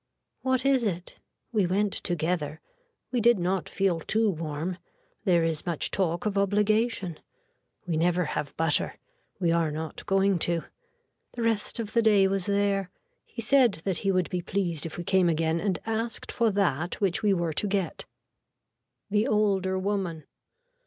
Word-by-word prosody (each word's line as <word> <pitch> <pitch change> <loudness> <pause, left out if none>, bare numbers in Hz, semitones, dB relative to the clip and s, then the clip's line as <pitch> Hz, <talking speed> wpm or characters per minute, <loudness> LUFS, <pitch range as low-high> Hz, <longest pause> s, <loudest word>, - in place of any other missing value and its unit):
What 260 0 0
is 270 -3 +3
it. 180 -5 -3 0.3
We 210 -6 +2
went 200 +2 +1
together. 160 -3 -2 0.5
We 245 -2 +1
did 235 0 +5
not 180 -1 -1
feel 195 -4 +1
too 215 +5 +1
warm. 165 +2 -4 0.5
There 175 -4 +4
is 165 +1 -1
much 170 -4 -1
talk 175 -2 -1
of 205 -1 +1
obligation. 205 -2 +1 0.7
We 165 -3 -1
never 175 +2 +2
have 145 -1 -4
butter. 165 -2 +1 0.4
We 175 -3 +2
are 165 -1 +2
not 155 +1 -5
going 195 -2 +3
to. 170 0 +1 0.7
The 240 - -3
rest 225 -2 0
of 220 -2 -4
the 230 - +4
day 205 -3 +5
was 195 -1 0
there. 200 -2 +1 0.4
He 230 - -7
said 245 -2 +5
that 190 -3 0
he 195 - +1
would 185 -2 0
be 180 - -1
pleased 175 -4 -1
if 155 - -9
we 175 - -4
came 185 0 +3
again 165 0 +1
and 190 -1 0
asked 225 +1 -2
for 235 -2 +2
that 175 -5 0
which 195 +1 +1
we 210 -2 +3
were 170 -4 0
to 205 - 0
get. 195 -3 -2 1.1
(The 210 +3 +2
older 195 -5 +1
woman.) 185 -5 -2
190 Hz, 165 wpm, -27 LUFS, 170-210 Hz, 1.1 s, did